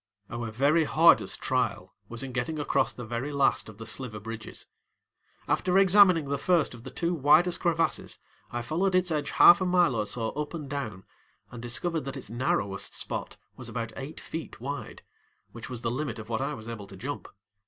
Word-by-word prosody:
Our 115 -1 -4
very 140 +8 +3
hardest 165 +3 +4
trial 110 -8 -1 0.2
was 120 +2 -5
in 135 - -5
getting 125 +5 -2
across 145 - +1
the 120 - -8
very 120 +5 -3
last 140 -5 +2
of 105 - -12
the 115 - -8
sliver 110 -2 -4
bridges. 110 0 -7 0.8
After 180 +1 +2
examining 190 -4 +6
the 140 0 -1
first 175 -5 +2
of 120 -1 -12
the - - -7
two 170 0 -1
widest 165 +3 +4
crevasses, 165 -1 0 0.3
I 120 0 -4
followed 180 +9 0
its 180 -1 +2
edge 150 -2 -1
half 175 - +7
a - - +1
mile 180 -6 +4
or 105 -2 -1
so 110 +2 -2
up 150 +3 -4
and 150 -4 -6
down 120 -9 -5 0.5
and 120 - -8
discovered 120 +8 -1
that 135 0 -5
its 125 - -8
narrowest 100 -5 -1
spot - - -5 0.2
was - - -8
about 115 -2 -4
eight 135 +3 -7
feet 160 0 -7
wide, 140 +4 -6 0.5
which 115 +1 -9
was 125 -2 -6
the 115 - 0
limit 135 -1 -3
of 110 0 -9
what 115 -1 -1
I - - -2
was 110 -1 -10
able 110 -4 -7
to 95 - -11
jump. 140 +8 -5
135 Hz, 195 wpm, -28 LUFS, 115-160 Hz, 0.8 s, half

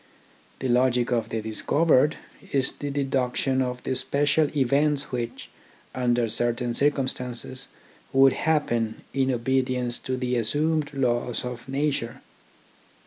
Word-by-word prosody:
The 130 - -3
logic 125 0 +2
of 115 -2 0
the 110 -1 -3
discovered 145 +6 +3 0.4
is 135 -2 +2
the 145 - -6
deduction 135 -1 0
of 125 -1 -3
the - - -1
special 145 +3 +2
events 140 +2 +1
which, 120 -2 -4 0.4
under 120 -2 +1
certain 120 +2 0
circum 140 0 +1
stances, 125 0 -4 0.4
would 135 0 +6
happen 120 -8 0
in 135 -1 +1
obedience 125 0 0
to 130 -1 -3
the 125 -1 -1
assumed 150 +7 0
laws 125 -2 0
of 125 +1 -7
nature. 135 -4 -2
130 Hz, 125 wpm, -25 LUFS, 120-140 Hz, 0.4 s, would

